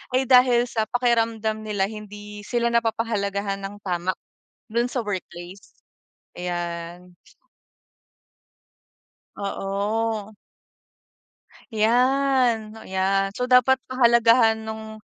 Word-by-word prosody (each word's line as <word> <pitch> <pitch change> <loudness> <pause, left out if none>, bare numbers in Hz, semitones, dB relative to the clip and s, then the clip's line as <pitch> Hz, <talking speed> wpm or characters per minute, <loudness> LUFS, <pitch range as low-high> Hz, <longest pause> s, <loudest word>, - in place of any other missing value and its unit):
ay 265 - +2
dahil 250 -1 +5
sa 220 -2 0
pakiramdam 225 -3 0
nila 205 -3 0
hindi 210 -1 -9
sila 235 -1 0
napapahalagahan 205 -4 -1
ng 200 +1 -6
tama 175 +1 0 0.6
dun 235 +1 +1
sa 250 - -2
workplace. 185 -1 -7 0.7
Ayan. 175 0 -5 2.2
Oo. 205 +2 -2 1.4
Yan, 245 -1 +2
yan. 195 +1 0
So 250 0 -3
dapat 255 +1 +5
pahalagahan 235 -2 +5
nung 220 0 -8
220 Hz, 85 wpm, -24 LUFS, 195-235 Hz, 2.2 s, dahil